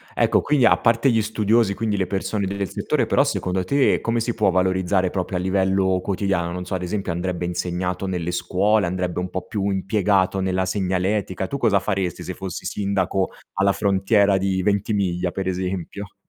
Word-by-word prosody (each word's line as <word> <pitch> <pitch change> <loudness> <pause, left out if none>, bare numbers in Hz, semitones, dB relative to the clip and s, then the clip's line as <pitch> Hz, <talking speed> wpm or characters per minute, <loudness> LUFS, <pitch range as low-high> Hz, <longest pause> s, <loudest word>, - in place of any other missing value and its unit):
Ecco, - - +3
quindi 145 -4 +2
a - - +6
parte 115 +3 +3
gli 115 -1 +2
studiosi, 110 0 +2
quindi 105 -1 -1
le 95 -2 0
persone 100 +1 -2
del 100 0 -2
settore - - -1
però - - +3
secondo 90 0 -1
te 140 +9 +2
come 115 0 0
si 120 +1 -1
può 105 -3 +2
valorizzare 95 0 +1
proprio 95 -1 -2
a - - -1
livello 95 0 +1
quotidiano? 95 -3 -1
Non 90 +1 -5
so, 90 - -6
ad 90 - -1
esempio 95 0 -2
andrebbe 90 +1 -2
insegnato 90 +2 -2
nelle 90 -2 -2
scuole, 95 +3 +1
andrebbe 90 0 -2
un 90 0 -3
po' 95 -1 -5
più 100 -2 -2
impiegato 95 0 +1
nella 95 0 0
segnaletica, 95 0 -1
tu 140 - -3
cosa 110 -6 +3
faresti 95 -3 -2
se 90 - -5
fossi 95 -1 -6
sindaco 95 -2 -1 0.2
alla 100 +1 +2
frontiera 100 0 +2
di 95 0 0
Ventimiglia 100 -3 0
per 95 +1 -4
esempio? 95 +1 -4
95 Hz, 180 wpm, -22 LUFS, 90-100 Hz, 0.2 s, a